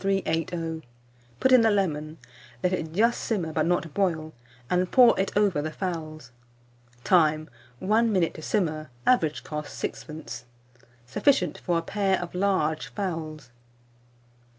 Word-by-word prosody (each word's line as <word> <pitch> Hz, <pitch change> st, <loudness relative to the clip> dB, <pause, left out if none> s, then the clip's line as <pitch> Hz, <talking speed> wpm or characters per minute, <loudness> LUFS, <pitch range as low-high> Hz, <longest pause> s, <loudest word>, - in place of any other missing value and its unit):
380; 165 Hz, -4 st, -1 dB, 0.6 s
put 260 Hz, -, +3 dB
in 255 Hz, -2 st, +8 dB
the 225 Hz, -, +4 dB
lemon; 155 Hz, -6 st, -1 dB, 0.5 s
let 180 Hz, 0 st, +2 dB
it 165 Hz, -3 st, -2 dB
just 230 Hz, +7 st, +2 dB
simmer, 175 Hz, -8 st, -2 dB
but 155 Hz, 0 st, +1 dB
not 170 Hz, -3 st, 0 dB
boil, 160 Hz, -5 st, -1 dB, 0.3 s
and 180 Hz, +3 st, +1 dB
pour 245 Hz, -2 st, +7 dB
it 195 Hz, -, +1 dB
over 200 Hz, -8 st, +2 dB
the 155 Hz, -, -3 dB
fowls. 155 Hz, -6 st, -5 dB, 0.7 s
Time. 155 Hz, -3 st, +3 dB, 0.3 s
1 220 Hz, -, +2 dB
minute 185 Hz, -5 st, +1 dB
to -, -, -9 dB
simmer. 155 Hz, -6 st, -1 dB, 0.2 s
Average 155 Hz, -, +2 dB
cost, 150 Hz, +2 st, -6 dB
6d. 125 Hz, -7 st, -6 dB, 0.6 s
Sufficient 180 Hz, -, +1 dB
for 175 Hz, -2 st, 0 dB
a 165 Hz, -, -1 dB
pair 195 Hz, +1 st, 0 dB
of 175 Hz, -1 st, -6 dB
large 180 Hz, -5 st, 0 dB
fowls. 155 Hz, -, -5 dB
170 Hz, 135 wpm, -26 LUFS, 155-195 Hz, 0.7 s, in